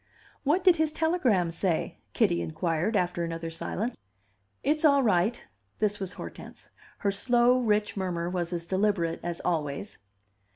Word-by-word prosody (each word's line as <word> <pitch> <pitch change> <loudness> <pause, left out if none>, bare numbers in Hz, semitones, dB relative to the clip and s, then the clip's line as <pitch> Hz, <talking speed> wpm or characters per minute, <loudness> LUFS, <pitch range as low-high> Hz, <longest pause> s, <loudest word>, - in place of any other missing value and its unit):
"What 310 +6 +2
did 365 -3 +6
his 315 -1 +1
telegram 265 - +1
say?" 170 0 -1
Kitty 85 - +2
inquired, 165 - -1
after 180 -2 0
another 165 0 -4
silence. 215 +8 -3 0.7
"It's 305 +2 +1
all 280 -3 +5
right." 210 +2 +2 0.3
This 205 -1 0
was 190 -2 -4
Hortense. - - -10 0.3
Her 200 - 0
slow, 240 +4 +3
rich 210 -3 +1
murmur 180 -3 -2
was 175 -1 -2
as 170 -1 -3
deliberate 190 -3 0
as 175 -1 -4
always. 155 +1 -2
195 Hz, 140 wpm, -28 LUFS, 170-240 Hz, 0.7 s, did